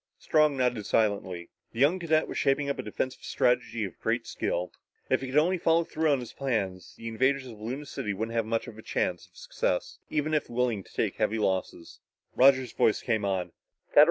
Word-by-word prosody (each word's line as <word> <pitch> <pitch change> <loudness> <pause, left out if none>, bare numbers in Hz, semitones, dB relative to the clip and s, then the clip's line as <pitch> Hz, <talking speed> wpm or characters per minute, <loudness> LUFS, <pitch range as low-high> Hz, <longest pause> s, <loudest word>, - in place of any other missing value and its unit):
Strong 155 -3 +3
nodded 125 -4 +1
silently. 95 -5 0 0.2
The 115 - -7
young 150 +8 +4
cadet 160 -2 +2
was - - -6
shaping 140 +1 +1
up - - -5
a - - +1
defensive 125 +4 -3
strategy 120 -3 +1
with 95 - -9
great - - 0
skill. 90 +1 -2 0.4
If - - +3
he 135 - -4
could 130 +3 -1
only 175 +4 +3
follow 165 +1 +3
through 160 -1 0
on 140 -3 +2
his 120 - -9
plans, 100 -9 -2
the 115 - -7
invaders 130 +4 +1
of 110 -4 -11
Luna 130 +7 -4
City 105 -6 -4
wouldn't 110 +4 -3
have 115 -1 +1
much 115 0 -1 0.2
chance - - -1
of - - -25
success - - -2
even 155 +1 -1
if 150 - 0
willing 120 -4 0
to - - -19
take - - -1
heavy 110 - +1
losses. 95 -4 -2 0.4
Roger's 130 -2 +5
voice 110 - +2
came 110 -3 0
on. 95 -3 -1
125 Hz, 195 wpm, -28 LUFS, 105-140 Hz, 0.4 s, Roger's